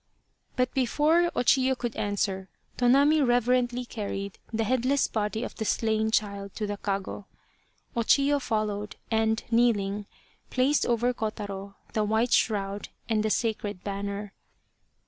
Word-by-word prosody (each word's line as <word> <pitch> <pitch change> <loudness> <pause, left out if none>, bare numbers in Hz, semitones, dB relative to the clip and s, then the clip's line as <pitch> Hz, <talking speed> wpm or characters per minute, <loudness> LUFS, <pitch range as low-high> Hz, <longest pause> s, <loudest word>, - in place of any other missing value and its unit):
But 250 0 +1
before 300 +6 +3
O - - +2
Chiyo 260 +1 +3
could 240 -2 -3
answer, 200 -2 -1 0.3
Tonami 280 +5 +4
reverently 245 0 +2
carried 200 -4 -5
the 225 0 0
headless 255 +4 +2
body 220 +1 -2
of - - -5
the 220 - -4
slain 220 0 +1
child 200 -3 -1
to 215 - -2
the 205 0 -3
kago. 195 0 -3 0.7
O 235 - +1
Chiyo 280 +4 +3
followed, 210 -3 -2 0.2
and 220 0 +1
kneeling, 210 -4 +2 0.4
placed 265 +3 +2
over 240 +1 +2
Kotaro 200 -3 -5 0.2
the 215 - +1
white 220 +3 +1
shroud 200 -2 +1 0.2
and 220 -1 +1
the 215 - 0
sacred 210 -4 -1
banner. 200 0 -4
220 Hz, 135 wpm, -27 LUFS, 205-245 Hz, 0.7 s, Tonami